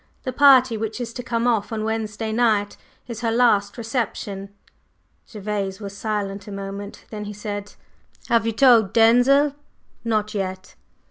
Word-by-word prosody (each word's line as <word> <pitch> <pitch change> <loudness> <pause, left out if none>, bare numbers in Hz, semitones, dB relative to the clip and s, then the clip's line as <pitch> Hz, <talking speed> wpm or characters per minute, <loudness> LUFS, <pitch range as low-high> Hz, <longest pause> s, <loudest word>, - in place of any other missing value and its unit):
The 255 - -4
party 260 -3 +6
which 220 +2 -4
is 235 -1 -5
to 245 - -5
come 235 -1 -2
off 230 -3 +1
on 220 -1 -2
Wednesday 220 0 -3
night 220 -3 +1 0.3
is 235 -2 -6
her 230 - 0
last 220 -4 +2
reception." 220 -4 -3 0.8
Gervase 200 -2 -4
was 200 -2 -7
silent 205 -1 -3
a - - -7
moment. 200 +1 -7
Then 210 -1 -6
he 210 - -6
said: 205 0 -6 0.5
"Have 230 -1 +2
you - - +1
told 225 -4 +5
Denzil?" 245 +5 +5 0.5
"Not 215 -2 -1
yet." 190 -2 -4
220 Hz, 150 wpm, -22 LUFS, 205-235 Hz, 0.8 s, party